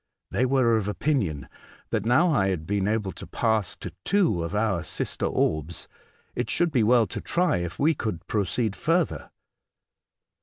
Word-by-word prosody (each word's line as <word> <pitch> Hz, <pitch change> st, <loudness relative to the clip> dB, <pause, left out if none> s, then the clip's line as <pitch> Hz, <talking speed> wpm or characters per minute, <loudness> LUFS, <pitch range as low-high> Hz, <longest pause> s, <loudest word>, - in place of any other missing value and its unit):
They 130 Hz, -, +1 dB
were 125 Hz, -4 st, +3 dB
of 105 Hz, -2 st, -2 dB
opinion 105 Hz, -, -1 dB, 0.4 s
that 110 Hz, -1 st, -1 dB
now 160 Hz, +9 st, +4 dB
I 95 Hz, -8 st, +2 dB
had 90 Hz, -5 st, -2 dB
been 100 Hz, +2 st, 0 dB
able 105 Hz, -2 st, 0 dB
to -, -, -10 dB
pass 110 Hz, -5 st, 0 dB
to -, -, -8 dB
two 180 Hz, -, +2 dB
of 85 Hz, +4 st, -4 dB
our 105 Hz, -5 st, +1 dB
sister -, -, -2 dB
orbs, 75 Hz, +1 st, -1 dB, 0.5 s
it -, -, -2 dB
would 175 Hz, -1 st, +2 dB
be 130 Hz, -5 st, +2 dB
well 115 Hz, +1 st, +4 dB
to -, -, -6 dB
try 175 Hz, -2 st, +1 dB
if 90 Hz, 0 st, -4 dB
we 155 Hz, +3 st, +3 dB
could 110 Hz, -, -4 dB
proceed 105 Hz, 0 st, -1 dB
further. 165 Hz, +1 st, 0 dB
110 Hz, 165 wpm, -26 LUFS, 95-130 Hz, 0.5 s, now